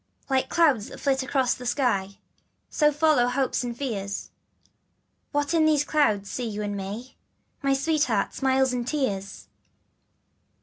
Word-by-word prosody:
L 265 - +4
IKE 260 - -1
clouds 285 -11 +3
that - - -10
flit 270 -1 +1
across 260 -1 +1
the 250 - -9
sky, 230 -7 0 0.5
So 300 -1 +3
follow 295 -4 +3
hopes 260 +1 0
and 240 -1 -5
fears. 205 -7 -4 1.0
What 290 +2 0
in 320 -2 +4
these 300 -2 +3
clouds 215 -11 +1
see 245 +4 -3
you 210 0 -4
and 205 -1 -3
me 205 +6 -6 0.4
Dear 275 -1 +2
Sweetheart, 280 -8 +1
smiles 265 -1 +2
or 245 -1 -1
tears? 210 -8 -3
260 Hz, 145 wpm, -26 LUFS, 210-285 Hz, 1.0 s, L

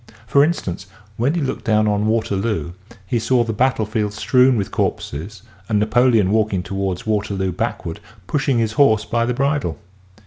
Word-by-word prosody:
For 140 +6 +4
instance 145 - -2 0.3
when 130 +9 0
he 170 - 0
looked 135 - -3
down 110 -1 +2
on 105 0 +1
Waterloo 105 -6 -1 0.3
he 115 +5 -1
saw 120 +2 +2
the 115 -1 -3
battle 125 -1 +1
field 105 -1 -2
strewn 125 +3 +3
with 100 -3 -2
corpses 90 +8 -3 0.3
and 110 - +2
Napoleon 110 -2 +3
walking 105 -4 +1
toward 95 -2 -3
Waterloo 100 -3 -1
backward 85 +1 -4 0.3
pushing 135 -1 0
his 115 -2 +1
horse 110 -3 +3
by 115 +1 0
the 125 - -1
bridle. 140 - 0
110 Hz, 165 wpm, -20 LUFS, 100-125 Hz, 0.3 s, For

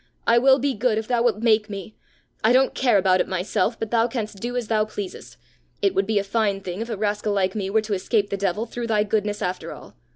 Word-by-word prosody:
I 235 +1 +5
will 265 +2 +5
be 280 0 0
good 225 0 0
if 220 0 -3
thou 245 -2 +1
wilt 230 -2 +1
make 215 -2 +3
me. 200 +1 -7 0.5
I 220 +3 +5
don't 260 +1 +3
care 245 -5 +3
about 185 -1 +3
it - - -2
myself, 190 +5 -1
but 225 - -4
thou 230 0 +3
canst 220 -4 -5
do 245 +4 -3
as 240 -3 -2
thou 215 -1 +2
pleasest. 205 -3 -7 0.4
It 195 -1 +1
would 195 0 0
be 220 -1 +1
a 200 - +2
fine 200 -1 0
thing 185 +1 -5
if 230 - -5
a 225 - -3
rascal 210 0 -1
like 190 -2 +1
me 195 -3 -3
were 220 +2 +2
to 215 -1 -4
escape 200 +2 0
the - - 0
devil 200 +2 -1
through 235 0 -5
thy 215 -2 +2
goodness 210 -1 -1
after 180 0 -3
all. - - -12
215 Hz, 255 wpm, -23 LUFS, 200-230 Hz, 0.5 s, I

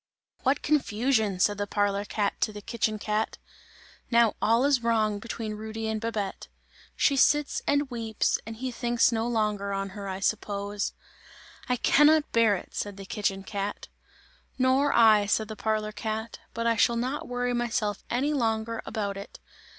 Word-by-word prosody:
"What 270 +2 +1
confusion!" 225 -8 +1
said 205 +2 +2
the 205 - -1
parlour 205 0 0
cat 205 -1 -1
to 215 - +1
the 210 - -8
kitchen 215 0 -1
cat. 215 +1 -2 0.7
"Now 235 -2 +4
all 230 +4 +3
is 280 -4 +3
wrong 220 -3 +1
between 220 -1 -5
Rudy 220 +1 -5
and 220 -1 -2
Babette. 215 -4 -3 0.5
She 280 - +3
sits 295 +2 +3
and 285 0 +2
weeps 225 -2 0
and 225 - -6
he 255 +3 -4
thinks 240 0 +2
no 225 0 0
longer 210 -4 0
on 195 0 -2
her, 200 +1 -7
I 190 0 -4
suppose. 200 0 -2 0.8
"I 250 - +3
cannot 295 +5 +4
bear 230 -3 +4
it!" - - -9
said 205 -1 -4
the 195 - -8
kitchen 195 -1 -2
cat. 200 +1 -4 0.7
"Nor 265 +2 +3
I," 215 -3 +5
said 215 +1 +1
the 220 - -5
parlour 215 0 -1
cat, 220 +1 -4 0.2
"but 230 0 -2
I 230 -1 +2
shall 235 +2 +3
not 255 +5 -2
worry 245 0 -1
myself 230 -4 -1
any 275 +5 0
longer 225 -3 -1
about 200 -2 -3
it! 200 - -9
220 Hz, 165 wpm, -27 LUFS, 205-240 Hz, 0.8 s, I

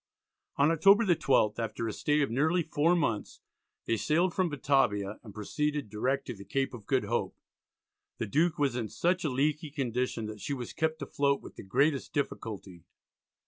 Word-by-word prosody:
On 145 +3 +4
October 195 +7 +5
the 175 -3 +4
12th, 130 -9 +2
after 115 0 -3
a 110 - -3
stay 150 0 +1
of 140 - 0
nearly 160 +8 +2
four 160 +2 +2
months, 115 -11 -1 0.5
they 115 - +1
sailed 170 - +1
from 185 -2 +1
Batavia 120 -8 +1
and 110 - -11
proceeded 145 +4 -2
direct 130 +6 -1
to 125 - -5
the 100 -3 -11
Cape 135 +7 -1
of 115 -4 -10
Good 130 -3 +2
Hope. 115 +4 -2 0.8
The - - -2
Duke 160 - +1
was 140 -5 +1
in 115 -4 -2
such 180 +2 0
a 155 - +1
leaky 150 +4 0
condition 125 -4 -2
that 105 -1 -7
she 140 - -2
was 125 -2 -6
kept 160 -1 -1
afloat 140 0 +1
with - - -11
the - - -8
greatest 140 +8 +1
difficulty. 105 - -4
140 Hz, 185 wpm, -30 LUFS, 115-155 Hz, 0.8 s, October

